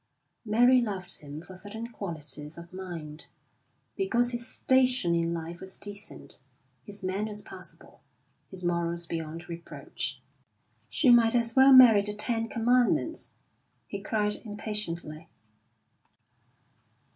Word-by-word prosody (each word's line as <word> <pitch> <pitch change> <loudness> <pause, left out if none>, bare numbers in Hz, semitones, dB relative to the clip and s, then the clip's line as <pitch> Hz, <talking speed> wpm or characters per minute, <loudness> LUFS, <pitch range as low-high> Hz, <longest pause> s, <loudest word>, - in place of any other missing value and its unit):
Mary 245 +4 +5
loved 195 -5 -3
him 150 +2 -9
for 185 +1 -12
certain 205 +4 -8
qualities 155 - -5
of 170 +1 -11
mind, 165 -5 -8 0.7
because 245 -11 +2
his 240 0 -2
station 255 -8 +2
in 170 0 +1
life 170 +1 -5
was 190 0 -4
decent, 205 -8 -6 0.4
his 200 +4 -9
manners 205 +3 -2
passable, - - -11 0.5
his 185 -1 -10
morals 170 0 0
beyond 165 0 -5
reproach. 170 0 -6 0.7
"She 260 -5 +4
might 235 -1 +6
as 230 -1 +2
well 265 +1 +7
marry 245 -6 +9
the 210 +1 -3
Ten 225 +1 +1
Commandments!" 245 +7 +1 0.5
he 200 - -6
cried 210 0 -1
impatiently. 175 -7 -5
205 Hz, 115 wpm, -28 LUFS, 170-230 Hz, 0.7 s, marry